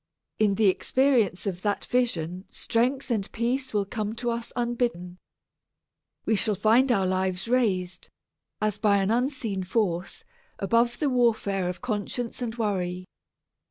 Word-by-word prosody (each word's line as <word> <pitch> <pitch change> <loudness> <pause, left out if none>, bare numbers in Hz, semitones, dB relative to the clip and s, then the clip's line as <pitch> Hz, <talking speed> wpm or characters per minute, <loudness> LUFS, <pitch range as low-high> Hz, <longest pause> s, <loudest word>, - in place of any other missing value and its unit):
In 210 -2 +3
the 220 - +2
experience 230 0 +2
of 185 -3 -3
that 205 0 -1
vision 185 -7 -1
strength 255 +3 -1
and 210 -4 -1
peace 255 +3 -1
will 205 -2 0
come 215 +1 -3
to 240 0 -2
us 235 0 -4
unbidden. 235 -7 -2 1.1
We - - +2
shall 210 +1 0
find 230 +6 +4
our 195 -5 +2
lives 185 +1 -1
raised, 185 -7 0 0.5
as 215 -1 0
by 205 -2 +4
an 195 +1 +1
unseen 240 -5 -1
force, 185 -3 -1 0.3
above 235 +4 +2
the 295 - +1
warfare 215 -7 +1
of 180 - -6
conscience 235 +1 -3
and 230 -2 -3
worry. 185 -5 -2
215 Hz, 140 wpm, -26 LUFS, 190-240 Hz, 1.1 s, find